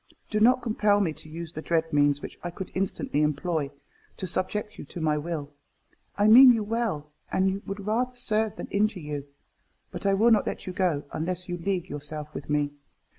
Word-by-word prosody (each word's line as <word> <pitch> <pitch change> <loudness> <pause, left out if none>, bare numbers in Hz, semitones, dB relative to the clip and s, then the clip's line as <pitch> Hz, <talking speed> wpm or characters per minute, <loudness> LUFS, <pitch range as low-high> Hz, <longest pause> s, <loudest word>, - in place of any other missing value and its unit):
Do 215 - +1
not 250 +4 +5
compel 210 -3 +2
me 175 -6 +1
to 155 - -10
use 165 +1 -7
the 155 - -5
dread 165 -1 0
means, 145 0 +3
which - - -8
I 175 - -2
could 180 +2 -7
instantly 185 -5 -1
employ, 150 0 0 0.5
to - - -4
subject 210 +4 -2
you - - -7
to 170 - -8
my 155 -2 +1
will. 150 -2 -4 0.7
I 205 - +3
mean 250 +4 +10
you 225 -2 0
well, 210 -9 -2 0.2
and 190 +1 +1
would 195 0 -5
rather 245 +4 0
serve 220 -3 0
than - - -6
injure 205 -1 +1
you. 145 -3 -5 0.6
But - - -3
I 195 - +4
will 225 +4 +4
not 215 -3 +4
let - - -4
you 185 - -5
go, 175 -6 0
unless 180 +2 -1
you 175 - -2
league 185 0 -1
yourself 150 0 -6
with 140 - -7
me. 145 -1 +1
180 Hz, 200 wpm, -27 LUFS, 150-210 Hz, 0.7 s, mean